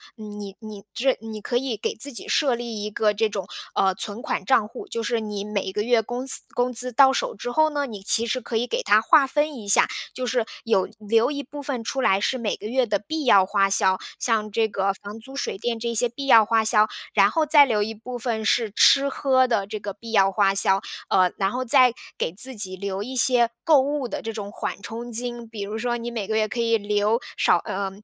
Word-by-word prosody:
你 210 -3 -9
你 215 -3 -10
这 260 +1 +1
你 220 -1 -8
可 240 - -1
以 255 -2 -2
给 215 - -4
自 280 +5 -2
己 - - -5
设 275 -5 +2
立 235 -3 -5
一 210 - -4
个 210 0 +1
这 220 +2 +1
种， 200 -3 -5 0.3
呃， 190 -1 +1
存 205 +4 -4
款 - - -3
账 235 -5 +3
户。 235 +3 -10
就 230 - -4
是 230 +1 -1
你 210 -2 -5
每 205 -2 -3
个 210 - -2
月 230 +1 +2
工 245 +4 -5
资 - - +6
工 245 +1 0
资 250 +1 +2
到 265 +2 +6
手 265 - -2
之 245 - -6
后 310 +4 +2
呢， 285 -2 -2
你 205 -4 -9
其 230 +3 +2
实 245 +3 -1
可 230 -1 -4
以 240 +2 -1
给 - - -2
它 215 - +4
划 275 +5 +5
分 295 +2 -1
一 210 -3 -10
下， 200 - +5 0.3
就 255 0 -4
是 245 -2 0 0.2
有 210 -5 +1
留 225 +5 +1
一 285 -1 -4
部 285 +2 -9
分 260 -5 -4
出 265 +4 -3
来 195 -6 +3
是 260 +5 0
每 225 -4 -2
个 210 - -8
月 255 +2 +1
的 205 -3 -1
必 310 +6 -5
要 200 -6 +6
花 195 +1 +1
销， 190 -1 +3 0.2
像 215 -3 0
这 220 +2 +1
个 195 -2 -1
房 205 +2 -10
租 265 +4 -12
水 275 - -3
电 230 +2 -3
这 235 0 -3
些 240 +2 +3
必 275 +3 -6
要 230 -4 +7
花 220 0 +1
销， 215 -1 +4 0.2
然 200 0 +4
后 320 -1 +1
再 295 -1 +7
留 220 -5 0
一 220 +2 -2
部 245 +3 -8
分 230 -2 -3
是 225 0 +1
吃 275 0 +5
喝 260 -2 +2
的 220 -5 0
这 215 +1 -6
个 200 -1 -6
必 230 +3 -11
要 195 -3 +4
花 195 0 +2
销。 195 0 +2 0.3
呃， 185 -1 +3
然 195 -1 0
后 255 +3 -3
再 250 0 +5 0.2
给 160 - -2
自 255 +7 +1
己 190 -3 -2
留 195 0 -4
一 255 +5 -6
些 240 -2 +4
购 310 -4 +5
物 280 -1 -2
的 - - -5
这 225 - -5
种 205 -2 -6
缓 200 - -5
冲 235 +3 -7
金， 240 0 -2
比 220 -2 -8
如 210 +2 -5
说 240 +1 -2
你 235 0 -6
每 215 -4 -4
个 220 - -2
月 215 0 +1
可 240 - -5
以 230 -1 +2
留 210 +2 0 0.2
少 - - +3
呃， 195 +2 -4
225 Hz, 265 characters per minute, -23 LUFS, 205-250 Hz, 0.3 s, 要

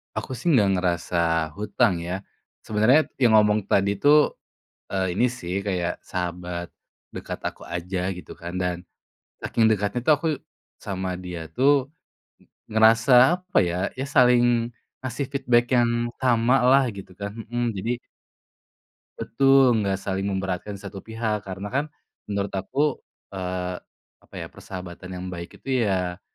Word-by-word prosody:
Aku - - -4
sih 125 - -6
nggak 105 -7 +4
ngerasa 90 -1 -1 0.4
hutang 100 -3 +1
ya. 90 +3 -4 0.4
Sebenarnya 110 +8 +4
yang 120 -3 +5
ngomong 105 0 +5
tadi 100 0 +2
tuh, 150 +3 +4 0.5
eee, 95 -2 0
ini 120 - +3
sih, 90 -8 -6
kayak 90 -4 -2
sahabat 90 -1 -4 0.5
dekat - - -6
aku - - -8
aja 90 +2 -3 0.2
gitu 85 - -11
kan 85 +1 -6
dan, 90 -1 -1 0.7
saking 115 - +1
dekatnya 105 +2 0
tuh 155 - +6
aku 160 - -2 0.5
sama 95 -1 -3
dia 90 -2 -6 0.2
tuh 140 +1 +3 0.8
ngerasa 110 +3 +4 0.3
apa 185 0 -4
ya, 85 - -2 0.2
ya 135 - -1
saling 120 -1 +4 0.3
ngasih 130 +2 -3
feedback 120 -4 +2
yang 120 -1 +2
samalah 125 +2 +4
gitu 95 - -10
kan, 100 0 -4
mhm, 120 +2 -2
jadi 110 +5 -2 1.3
Betul, 135 -3 +4
nggak 95 -1 0
saling 95 0 -2
memberatkan 95 +1 -3
satu 100 0 -9
pihak. 110 -2 -3
Karena 95 +1 -6
kan 140 +3 +1 0.4
menurut 100 -1 -2
aku, 135 +10 -1 0.3
eee, 90 -1 -4 0.4
apa - - -18
ya, - - -5
persahabatan 90 0 -9
yang 90 0 -6
baik 85 -1 -8
itu 130 -2 -1
ya, 90 -1 -1
105 Hz, 135 wpm, -24 LUFS, 95-120 Hz, 1.3 s, tuh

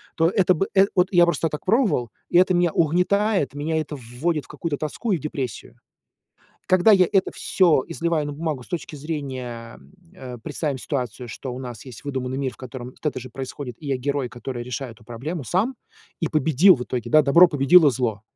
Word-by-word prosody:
то 165 - +3
это 185 -1 +3
бы 195 - 0
эт 195 0 +5
вот 180 -1 +4
я 175 -2 +6
просто 165 -1 0
так 150 - -6
пробовал, 200 - +2 0.2
и - - +3
это 185 0 +4
меня 175 -1 +2
угнетает, 180 - +1
меня 155 +3 -1
это 155 -1 -5
в 135 - -11 0.2
вводит 160 -4 0
в - - -20
какую-то 150 0 -4
тоску 155 - -3
и 185 - +2
в - - -12
депрессию. 135 - -5 0.9
Когда 185 +4 +5
я 185 -3 +5
это 195 -2 +2
всё 170 -8 +2
изливаю 165 -2 -1
на - - -4
бумагу 155 -3 -3
с - - -16
точки 175 -3 -5
зрения, 130 -6 -6 0.3
э, 130 -8 -9
представим 145 -4 -3
ситуацию, 125 -3 -4
что 130 +3 -6
у 125 - -6
нас 120 -4 -8
есть 125 -1 -11
выдуманный 130 -2 -3
мир, 135 -2 -2
в - - -19
котором 130 -1 -8
вот - - -26
это 150 - -1
же 130 +1 -9
происходит, 130 -1 -6
и 150 - -8
я 135 -2 0
герой, 140 0 -2
который 120 +1 -6
решает 125 +1 -5
эту 110 - -21
проблему 135 +8 -5
сам 190 - 0 0.5
и 165 - 0
победил 155 +5 +5
в 125 - -5
итоге, 125 -2 -4
да, 155 -1 +6
добро 170 +6 +7
победило 150 +2 +5
зло. 115 -5 -2
145 Hz, 210 wpm, -23 LUFS, 130-175 Hz, 0.9 s, добро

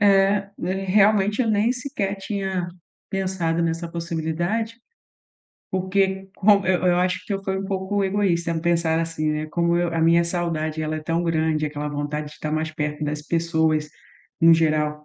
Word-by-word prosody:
É, 200 0 +4 0.4
realmente 210 +3 +3
eu 225 - 0
nem 215 +3 +2
sequer 245 -7 -3
tinha 190 -3 -3 0.4
pensado 185 -4 -1
nessa 165 +1 -2
possibilidade. 170 +7 -2 1.0
Porque 190 +1 0
como 200 -1 +4
eu 185 -1 +2
eu 175 - +4
acho 180 0 0
que - - -4
eu 195 0 -2
fui 190 -1 -2
um 195 - -4
pouco 195 +1 -1
egoísta 190 -4 +1
em 165 -1 -1
pensar 165 -1 +1
assim, 165 -2 -1
né. 150 0 -2
Como 170 +2 +1
eu 175 0 +1
A 165 - +1
minha 165 +1 +5
saudade, 160 -3 -2
ela 155 0 -2
é 155 - -6
tão 165 +2 0
grande, 160 -2 +1
aquela 150 0 -4
vontade 150 +1 -4
de - - -16
tá 155 - -3
mais 155 0 -1
perto 150 -1 -3
das 150 0 -3
pessoas, 160 -2 +1 0.5
no 165 0 +7
geral. 150 -2 +1
170 Hz, 170 wpm, -23 LUFS, 160-195 Hz, 1.0 s, no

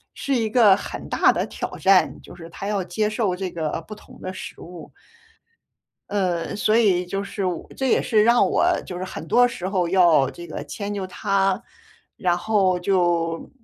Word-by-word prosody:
是 275 - -1
一 225 -3 0
个 215 -4 +6
很 - - -7
大 - - +4
的 - - -1
挑 - - -6
战， 190 -1 +3
就 - - -13
是 170 -2 -10
他 195 +4 -7
要 205 -2 -1
接 200 +4 -1
受 215 -4 -1
这 185 0 -4
个 160 -1 -3
不 215 - -7
同 - - -16
的 185 - -5
食 - - -9
物。 175 -1 -11 1.2
呃， 180 -4 -1
所 215 +1 +1
以 190 -6 +3
就 195 +3 -3
是 200 -1 -4
我 180 -2 -3
这 265 - 0
也 - - +3
是 215 -2 +3
让 235 -2 +4
我 - - +2 0.2
就 180 - -6
是 180 - -4
很 185 - -7
多 245 +9 +5
时 185 -6 -5
候 185 -3 0
要 170 -7 +4
这 175 - -10
个 160 - -6
迁 205 -1 -5
就 195 -2 -4
他， 195 +1 0 0.6
然 175 -2 +1
后 190 -1 +1
就 175 -3 0
190 Hz, 205 characters per minute, -23 LUFS, 175-210 Hz, 1.2 s, 个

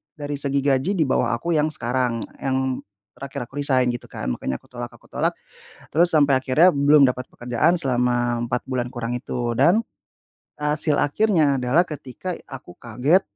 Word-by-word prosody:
dari 145 -1 -4
segi 140 0 +1
gaji 140 +7 +1
di - - +5
bawah 130 - +1
aku 170 +7 -2
yang 150 +1 +2
sekarang, 125 -1 -1 0.2
yang 130 -1 -1 0.3
terakhir 135 -3 -6
aku 135 - -12
resign 130 -3 +2
gitu 120 - -7
kan. - - -7
Makanya 65 +1 -3
aku - - -27
tolak, 120 -1 -6
aku - - -19
tolak - - 0 0.6
terus 170 +3 +5
sampai 145 -3 +4
akhirnya 150 +7 +5
belum 140 0 +5
dapat 125 0 -2
pekerjaan 125 +9 +1
selama 120 -4 +1
4 125 0 -2
bulan 125 -2 -2
kurang 120 -2 -4
itu 120 -1 -3
dan 170 - +4 0.8
hasil 150 +1 +1
akhirnya 155 -3 +2
adalah 125 +7 +3
ketika 150 +4 -6
aku 130 -10 -11
kaget 125 - +2
135 Hz, 165 wpm, -22 LUFS, 125-150 Hz, 0.8 s, di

